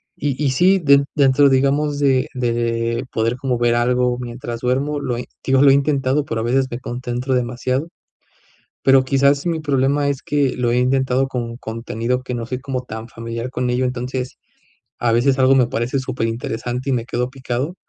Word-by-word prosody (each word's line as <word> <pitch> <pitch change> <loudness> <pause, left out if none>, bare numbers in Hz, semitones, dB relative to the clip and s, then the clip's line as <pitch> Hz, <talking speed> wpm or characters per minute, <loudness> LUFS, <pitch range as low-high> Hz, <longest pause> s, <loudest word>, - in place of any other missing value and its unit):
Y 140 -1 -2
y 140 - +2
sí, 185 +8 +4
den 140 -4 +4
dentro, 140 0 +5
digamos, 140 +2 +1
de 135 -3 +2
de 115 -1 -1
poder 115 +2 0
como 130 -2 -1
ver 120 0 +2
algo 125 +1 +1
mientras 120 -1 -6
duermo, 140 +4 0
lo 125 -4 -2
he 125 - -5 0.2
digo, 135 0 +3
lo 140 -1 +7
he - - +6
intentado, 140 0 +1
pero 115 -4 -3
a - - -2
veces 130 +3 +1
me 120 - -4
concentro 125 +1 -3
demasiado, 125 +4 -1 1.0
pero 135 0 +5
quizás 140 +2 +2
mi 165 -2 0
problema 140 0 +1
es 140 -1 -3
que 145 -3 +1
lo 120 -1 +1
he 120 - +1
intentado 130 +1 +1
con 120 -3 -4
contenido 115 +2 -3
que 125 - -5
no 115 - -4
soy 125 +2 -4
como 130 -1 -4
tan 110 -1 -7
familiar 115 +2 -5
con 125 -1 -2
ello, 125 +1 +1
entonces 125 +1 -4 0.6
a 120 -1 +1
veces 130 +3 +2
algo 130 0 +5
me 130 -2 +4
parece 120 +4 -1
superinteresante 125 0 -3
y - - +1
me 120 -2 -1
quedo 125 -1 -2
picado. 130 +4 -3
130 Hz, 190 wpm, -20 LUFS, 120-135 Hz, 1.0 s, lo